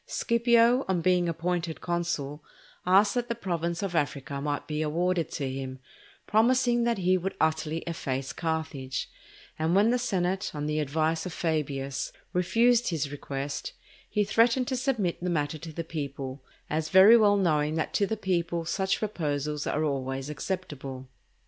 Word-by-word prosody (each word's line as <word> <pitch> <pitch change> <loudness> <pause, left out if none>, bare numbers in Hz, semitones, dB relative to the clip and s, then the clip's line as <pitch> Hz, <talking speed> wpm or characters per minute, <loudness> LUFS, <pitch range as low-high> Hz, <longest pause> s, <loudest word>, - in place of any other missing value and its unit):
Scipio, 235 +1 +3
on 185 -3 +1
being 180 0 +3
appointed 170 0 -2
consul, 165 -4 -2 0.4
asked 200 +3 +5
that 245 -1 -1
the 235 - -1
province 170 -4 -2
of 195 -3 -2
Africa 140 -3 -1
might 145 0 -2
be 150 0 -2
awarded 170 +2 0
to 140 - -2
him, 130 0 -5 0.5
promising 240 +2 +3
that 235 -2 +1
he 185 0 +2
would 190 +2 -3
utterly 160 0 0
efface 135 -5 -3
Carthage; 160 -5 -3 0.5
and 160 +3 +1
when 210 +4 +5
the 250 - +2
senate, 190 -5 -1
on 145 0 -3
the 150 +1 0
advice 160 +3 0
of 175 - -6
Fabius, 140 -5 -2 0.2
refused 230 +7 +3
his 150 -5 -2
request, 140 0 -5 0.4
he 210 - +1
threatened 230 +4 +3
to 260 - 0
submit 240 -11 -1
the 180 - -1
matter 155 -2 -1
to 165 0 -8
the 165 +2 -4
people 140 -4 -5 0.2
as 155 +1 -2
very 190 +6 +8
well 205 -3 +5
knowing 155 -5 +1
that 160 - -2
to 200 - +2
the 220 - -2
people 170 -4 -1
such 190 +3 0
proposals 150 -7 -2
are 150 - 0
always 135 -1 -2
acceptable. 140 -5 -5
165 Hz, 160 wpm, -28 LUFS, 150-195 Hz, 0.5 s, very